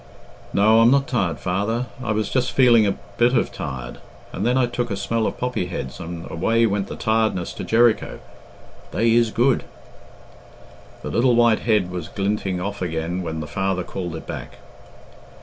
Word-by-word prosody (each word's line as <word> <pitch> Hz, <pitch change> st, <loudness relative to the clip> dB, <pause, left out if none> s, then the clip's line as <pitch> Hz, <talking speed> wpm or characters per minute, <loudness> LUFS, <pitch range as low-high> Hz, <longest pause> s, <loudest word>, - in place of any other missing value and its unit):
"No, 110 Hz, +3 st, +4 dB
I'm 115 Hz, -, +6 dB
not 140 Hz, +1 st, +3 dB
tired, 100 Hz, -11 st, -1 dB
father. 105 Hz, +7 st, -1 dB, 0.2 s
I 115 Hz, -, -1 dB
was 110 Hz, -1 st, -1 dB
just 130 Hz, -1 st, 0 dB
feeling 120 Hz, -5 st, +5 dB
a 100 Hz, -, -1 dB, 0.2 s
bit 120 Hz, +2 st, +4 dB
of -, -, 0 dB
tired, 65 Hz, -3 st, -6 dB, 0.3 s
and 100 Hz, +5 st, -1 dB
then 125 Hz, +2 st, +2 dB
I 130 Hz, -, +4 dB
took 120 Hz, 0 st, -3 dB
a 100 Hz, -, -2 dB
smell 115 Hz, +1 st, -1 dB
of -, -, -4 dB
poppy 125 Hz, -7 st, -2 dB
heads 65 Hz, -6 st, -6 dB
and 85 Hz, -1 st, -6 dB
away 115 Hz, +8 st, +2 dB
went 100 Hz, -2 st, 0 dB
the -, -, -6 dB
tiredness 110 Hz, -5 st, 0 dB
to -, -, -6 dB
Jericho. 115 Hz, 0 st, +2 dB, 0.7 s
They 115 Hz, +1 st, +2 dB
is 120 Hz, -1 st, +4 dB
good." 120 Hz, +3 st, +2 dB, 1.4 s
The -, -, -4 dB
little 120 Hz, 0 st, +3 dB
white 120 Hz, -2 st, +4 dB
head 105 Hz, -6 st, +1 dB
was 90 Hz, -3 st, -5 dB
glinting 100 Hz, -2 st, -2 dB
off 100 Hz, +2 st, -4 dB
again 85 Hz, +1 st, -2 dB
when 80 Hz, -2 st, -4 dB
the -, -, -5 dB
father 95 Hz, 0 st, -1 dB
called 90 Hz, -3 st, -5 dB
it 80 Hz, -, -8 dB
back. -, -, -7 dB
105 Hz, 180 wpm, -22 LUFS, 90-120 Hz, 1.4 s, I'm